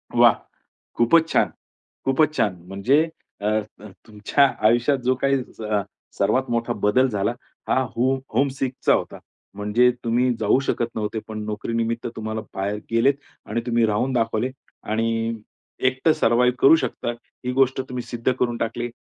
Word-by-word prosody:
वाह! -, -, +7 dB, 0.6 s
खूपच 160 Hz, +8 st, +4 dB
छान, -, -, +2 dB, 0.6 s
खूपच 150 Hz, +3 st, +2 dB
छान. 100 Hz, -4 st, +1 dB
म्हणजे 115 Hz, +11 st, +2 dB, 0.4 s
अ, 105 Hz, +1 st, +1 dB, 0.5 s
तुमच्या 110 Hz, +6 st, +2 dB, 0.2 s
आयुष्यात 120 Hz, +5 st, +3 dB
जो 130 Hz, +1 st, +3 dB
काही 135 Hz, 0 st, +3 dB, 0.2 s
स -, -, -10 dB, 0.6 s
सर्वात 130 Hz, 0 st, +1 dB
मोठा 115 Hz, 0 st, 0 dB
बदल 125 Hz, +6 st, +4 dB
झाला, 105 Hz, -1 st, 0 dB, 0.4 s
हा -, -, +3 dB, 0.2 s
हो 130 Hz, +3 st, +2 dB, 0.2 s
होम 135 Hz, +5 st, +3 dB
सिकचा 130 Hz, -1 st, +1 dB
होता, -, -, -2 dB, 0.4 s
म्हणजे 105 Hz, +5 st, +3 dB
तुम्ही 120 Hz, +2 st, +2 dB
जाऊ 110 Hz, +4 st, +3 dB
शकत 120 Hz, -, 0 dB
नव्हते, 110 Hz, 0 st, -2 dB
पण 110 Hz, -1 st, -5 dB
नोकरीनिमित्त 115 Hz, +2 st, -2 dB
तुम्हाला 110 Hz, 0 st, -4 dB
बाहेर 100 Hz, +2 st, -1 dB, 0.2 s
गेलेत 115 Hz, +5 st, +4 dB, 0.3 s
आणि 115 Hz, -, -2 dB
तुम्ही 120 Hz, -1 st, +3 dB
राहून 110 Hz, +5 st, 0 dB
दाखवले. 115 Hz, 0 st, 0 dB, 0.3 s
आणि 115 Hz, +1 st, -1 dB, 0.5 s
एकटं 130 Hz, +5 st, +2 dB
सर्वाईव 125 Hz, 0 st, +3 dB
करू 140 Hz, -, +7 dB
शकता, 130 Hz, -5 st, -2 dB
ही 120 Hz, +1 st, -8 dB
गोष्ट 130 Hz, 0 st, +2 dB
तुम्ही 125 Hz, -1 st, -4 dB
सिद्ध 120 Hz, +2 st, -1 dB
करून 120 Hz, -1 st, 0 dB
टाकले. 120 Hz, +1 st, -3 dB
120 Hz, 145 wpm, -23 LUFS, 110-130 Hz, 0.6 s, वाह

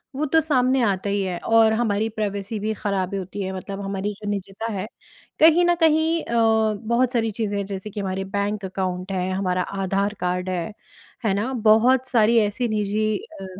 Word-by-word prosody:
वो 295 Hz, +3 st, -1 dB
तो 320 Hz, +3 st, +3 dB
सामने 265 Hz, -4 st, +2 dB
आता 200 Hz, -2 st, 0 dB
ही 200 Hz, 0 st, 0 dB
है 185 Hz, -2 st, -2 dB
और 225 Hz, +1 st, +4 dB
हमारी 220 Hz, -2 st, 0 dB
प्राइवेसी 210 Hz, -1 st, -3 dB
भी 215 Hz, +2 st, -1 dB
ख़राब 195 Hz, -3 st, -2 dB
होती 195 Hz, +1 st, -5 dB
है। 190 Hz, -1 st, -3 dB
मतलब 195 Hz, +1 st, -6 dB
हमारी 195 Hz, +1 st, -3 dB
जो 205 Hz, 0 st, -7 dB
निजता 200 Hz, +2 st, -4 dB
है 200 Hz, 0 st, -4 dB, 0.5 s
कहीं 330 Hz, +3 st, +6 dB
न 350 Hz, 0 st, +3 dB
कहीं 320 Hz, +1 st, +3 dB
अ, 225 Hz, -2 st, +2 dB
बहुत 240 Hz, +2 st, +2 dB
सारी 225 Hz, -2 st, +1 dB
चीज़ें 205 Hz, -1 st, -2 dB
हैं 200 Hz, -, -2 dB
जैसे 195 Hz, +1 st, -6 dB
कि 210 Hz, -, -7 dB
हमारे 190 Hz, -1 st, -2 dB
बैंक 200 Hz, 0 st, -1 dB
अकाउंट 185 Hz, 0 st, -3 dB
हें 185 Hz, -1 st, -1 dB
हमारा 185 Hz, -1 st, 0 dB, 0.2 s
आधार 195 Hz, +2 st, 0 dB
कार्ड 180 Hz, +1 st, -1 dB
है। 180 Hz, +2 st, -3 dB, 0.5 s
है 205 Hz, -, +2 dB
ना? 210 Hz, +6 st, -1 dB
बहुत 240 Hz, +3 st, +4 dB
सारी 230 Hz, -2 st, +3 dB
ऐसी 215 Hz, +3 st, 0 dB
निजी 215 Hz, 0 st, 0 dB
अ, 195 Hz, -, -11 dB
210 Hz, 190 wpm, -23 LUFS, 195-230 Hz, 0.5 s, कहीं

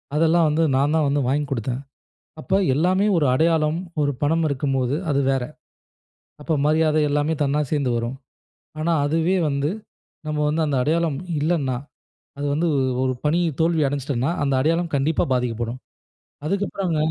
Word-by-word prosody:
அதெல்லாம் 165 Hz, +1 st, +3 dB
வந்து 155 Hz, +2 st, +1 dB
நான்தான் 150 Hz, +2 st, +2 dB
வந்து 145 Hz, 0 st, +1 dB
வாங்கி 145 Hz, +2 st, +1 dB
கொடுத்தேன். 125 Hz, +1 st, -2 dB, 0.6 s
அப்ப 190 Hz, -, -4 dB, 0.2 s
எல்லாமே 185 Hz, +6 st, +2 dB
ஒரு 155 Hz, -, +2 dB
அடையாளம், 160 Hz, +1 st, +2 dB, 0.2 s
ஒரு 145 Hz, -1 st, +2 dB
பணம் 165 Hz, +3 st, +2 dB
இருக்கும்போது, 135 Hz, -1 st, 0 dB, 0.2 s
அது 140 Hz, 0 st, +2 dB
வேற. 135 Hz, -2 st, 0 dB, 1.0 s
அப்போ 160 Hz, +2 st, 0 dB
மரியாதை 155 Hz, 0 st, +3 dB
எல்லாமே 150 Hz, +2 st, +1 dB
தன்னா 145 Hz, +1 st, +1 dB
சேர்ந்து 140 Hz, -4 st, +1 dB
வரும். 120 Hz, +3 st, -3 dB, 0.6 s
ஆனா, 170 Hz, +2 st, +1 dB
அதுவே 165 Hz, +5 st, +1 dB
வந்து 140 Hz, +1 st, 0 dB, 0.6 s
நம்ம 155 Hz, -1 st, -2 dB
வந்து 160 Hz, +2 st, 0 dB
அந்த 145 Hz, -2 st, 0 dB
அடையாளம் 160 Hz, 0 st, 0 dB, 0.2 s
இல்லன்னா, 145 Hz, -5 st, 0 dB, 0.6 s
அது 145 Hz, -, -2 dB
வந்து 165 Hz, +4 st, +1 dB, 0.4 s
ஒரு 130 Hz, 0 st, +1 dB
பணி 155 Hz, +4 st, +2 dB, 0.2 s
தோல்வி 165 Hz, -2 st, +2 dB
அடஞ்சிட்டன்னா, 140 Hz, 0 st, -1 dB
அந்த 140 Hz, -1 st, +1 dB, 0.2 s
அடையாளம் 170 Hz, -1 st, -2 dB
கண்டிப்பா 140 Hz, +3 st, +1 dB
பாதிக்கப்படும். 120 Hz, 0 st, -2 dB, 0.7 s
அதுக்கப்பறங்க 195 Hz, -2 st, -1 dB
150 Hz, 140 wpm, -22 LUFS, 135-165 Hz, 1.0 s, அதெல்லாம்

